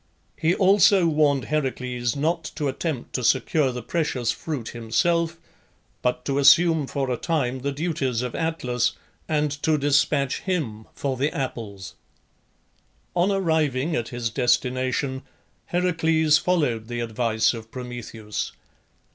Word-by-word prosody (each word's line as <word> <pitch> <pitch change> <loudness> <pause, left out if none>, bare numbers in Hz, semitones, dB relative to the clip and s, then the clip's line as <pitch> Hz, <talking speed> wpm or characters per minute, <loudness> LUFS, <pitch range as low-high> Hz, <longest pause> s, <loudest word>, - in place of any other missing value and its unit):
He 165 +3 +1
also 195 -1 +5
warned 150 -4 +2
Heracles 125 -4 -1
not 160 +3 0
to 145 - -1
attempt 135 -1 -3
to 125 - -2
secure 140 +3 +2
the 125 -1 -6
precious 140 -6 -1
fruit 145 -8 -5
himself, 165 +9 0 0.6
but 125 0 -1
to 140 0 0
assume 150 +1 +5
for 135 -2 -2
a 125 - 0
time 130 -6 -1
the 140 +2 -2
duties 140 -5 -1
of 125 - -4
Atlas, 130 -8 0 0.4
and 150 -2 +1
to 155 -1 +2
despatch 140 -1 +2
him 130 - -3
for 135 -2 -2
the 140 +4 +1
apples. 100 -8 -5 1.2
On 180 +3 +3
arriving 160 -5 +1
at 115 - -1
his 120 -2 -3
destination 130 +2 0 0.5
Heracles 160 -3 +2
followed 145 -12 0
the 120 0 -3
advice 115 0 +1
of 115 -1 -8
Prometheus. 120 -4 -6
140 Hz, 130 wpm, -24 LUFS, 125-160 Hz, 1.2 s, also